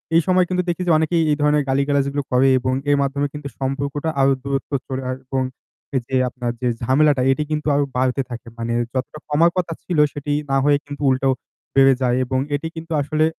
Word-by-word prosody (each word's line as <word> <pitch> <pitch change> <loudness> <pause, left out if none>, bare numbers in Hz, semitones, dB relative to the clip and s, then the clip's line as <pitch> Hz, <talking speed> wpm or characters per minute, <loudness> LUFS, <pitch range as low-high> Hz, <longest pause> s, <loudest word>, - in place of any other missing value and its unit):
এই 165 - +6
সময় 185 -1 +4
কিন্তু 180 0 0
দেখি 175 +1 -2
যে - - +4
অনেকেই 160 +1 +2
এই 145 - +2
ধরনের 150 0 +3
গালিগালাজগুলো 140 +1 +1
করে 125 +2 +4
এবং 130 +1 -1 0.2
এর 145 - +4
মাধ্যমে 140 +1 0
কিন্তু 150 -1 -6
সম্পর্কটা 140 +3 -2
আরো 135 0 +5
দূরত্ব 140 0 -3 0.2
চলে 130 -1 -3 0.2
এবং 130 0 -1 0.5
এই 130 - +2
যে 130 - -2
আপনার 125 -1 -3
যে 125 - 0
ঝামেলাটা 135 +2 +3
এটি 150 +3 0
কিন্তু 150 0 -2
আরো 145 0 +2
বাড়তে 130 +1 +1
থাকে। 120 0 -8
মানে 115 0 -2 0.2
যতটা 135 +3 -3
কমার 165 +3 +4
কথা 170 -2 -1
ছিল 175 - -2 0.2
সেটি 145 0 -3 0.2
না 135 - +3
হয়ে 145 -1 +5
কিন্তু 145 0 -8
উল্টোও 130 0 +2 0.4
বেড়ে 135 0 +6
যায় 125 -1 +2
এবং 130 +1 -1 0.2
এটি 155 +3 -3
কিন্তু 165 0 -8
আসলে 155 +2 +1
140 Hz, 200 wpm, -21 LUFS, 130-150 Hz, 0.5 s, এই